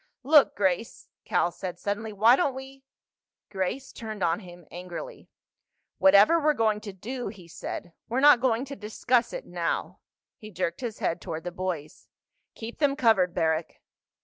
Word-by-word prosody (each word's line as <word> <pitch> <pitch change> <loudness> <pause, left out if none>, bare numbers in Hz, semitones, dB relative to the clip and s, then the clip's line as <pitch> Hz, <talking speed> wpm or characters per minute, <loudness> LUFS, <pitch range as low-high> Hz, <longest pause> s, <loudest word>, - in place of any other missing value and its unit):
"Look, 290 +1 +5
Grace," 195 +2 -1 0.2
Cal 175 - +1
said 180 0 -6
suddenly, 205 +3 -3
"why 220 +4 +5
don't 275 -4 0
we—?" 265 0 -10 0.7
Grace 195 +8 -3
turned 215 -4 -6
on 170 +2 +1
him 175 -4 -13
angrily. 180 - -8 0.7
"Whatever 200 +12 +6
we're 305 -1 +2
going 215 -3 +1
to 210 -2 -7
do," 240 +7 -6
he 195 -4 -10
said, 170 +1 -7 0.2
"we're 245 +3 0
not 285 -3 +7
going 250 0 +1
to 280 +1 -7
discuss 225 +4 0
it - - -6
now." - - -3 0.4
He 215 - -10
jerked 175 -1 -3
his 235 -4 -4
head 165 - -2
toward 160 -1 -5
the 175 - -4
boys. 180 -5 -5 0.5
"Keep 230 +1 -8
them 285 -2 +2
covered, 220 -10 +3
Barrack." 160 -1 -1
215 Hz, 160 wpm, -27 LUFS, 180-255 Hz, 0.7 s, not